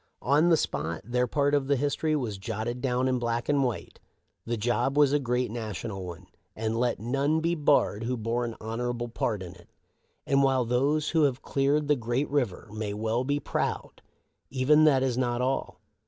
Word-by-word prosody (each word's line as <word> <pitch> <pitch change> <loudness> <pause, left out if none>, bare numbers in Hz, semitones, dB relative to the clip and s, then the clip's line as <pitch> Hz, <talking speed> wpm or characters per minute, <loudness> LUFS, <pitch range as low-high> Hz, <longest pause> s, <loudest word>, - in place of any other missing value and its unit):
" - - -50
On 155 +4 +5
the 165 - +5
spot, 80 - -2
their 125 +1 0
part 145 +3 +1
of 140 -2 +2
the 140 - +3
history 145 +3 0
was 115 -9 -3
jotted 115 +4 -4
down 130 -1 +1
in 130 -1 +1
black 120 0 -2
and 145 -1 +2
white. 120 -5 -4 0.5
The 120 0 -1
job 120 +5 0
was 145 -2 +5
a 145 - +3
great 125 -3 -1
national 105 -3 -5
one; 90 +1 -9 0.3
and 110 0 -2
let 120 0 0
none 140 +7 0
be 165 +1 0
barred 145 -8 +2
who 125 +1 -1
bore 115 +2 -1
an 115 -1 -4
honorable 120 +2 -3
part 110 -3 -2
in 90 -1 -8
it. 85 -2 -19 0.6
And 140 0 +3
while 135 -2 +2
those 140 +6 +1
who 160 -3 +4
have 135 -2 -1
cleared 140 +2 +1
the 150 - +4
great 120 +3 -1
river 125 -11 -1
may 105 -2 -3
well 110 +3 -1
be 145 +2 0
proud, - - -3 0.5
even 145 +4 +4
that 135 -4 +4
is 130 -2 0
not 120 -1 0
all. 130 +2 -2
125 Hz, 200 wpm, -27 LUFS, 115-140 Hz, 0.6 s, On